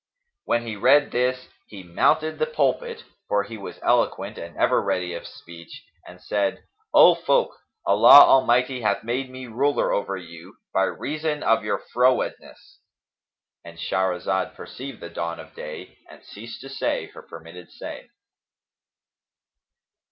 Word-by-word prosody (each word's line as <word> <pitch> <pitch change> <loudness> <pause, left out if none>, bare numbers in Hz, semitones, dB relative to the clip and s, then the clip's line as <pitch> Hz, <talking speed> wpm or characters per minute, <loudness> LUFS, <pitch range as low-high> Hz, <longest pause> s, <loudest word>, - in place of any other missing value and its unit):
When 120 0 0
he 110 -2 -5
read 140 +7 +4
this, 125 +1 -1 0.2
he 100 -3 -11
mounted 155 - +1
the 470 - +1
pulpit 475 -1 -1 0.2
(for 100 0 +1
he 110 +3 -9
was 100 - -9
eloquent - - 0
and - - -10
ever - - +2
ready 90 -1 -2
of 85 - -7
speech), 85 0 -13 0.2
and 90 - -13
said, 100 +5 -2 0.3
'O - - +8
folk, - - 0 0.3
Allah - - +9
Almighty 125 0 +3
hath 110 - 0
made 125 +3 -3
me 130 0 -9
ruler 135 +5 0
over 100 -1 -2
you, 85 0 -12 0.2
by 95 - +3
reason 155 +4 -3
of 115 0 +2
your - - -1 0.2
frowardness;'"—And 125 -8 -4
Shahrazad 95 +1 -1
perceived 135 -1 -9
the 85 - -8
dawn 85 0 -4
of - - -12
day 75 0 -9
and - - -15
ceased 115 +3 -11
to 135 - -10
say 135 0 -2
her - - -11
permitted 85 +2 -12
say. - - -10
115 Hz, 140 wpm, -23 LUFS, 90-130 Hz, 0.3 s, Allah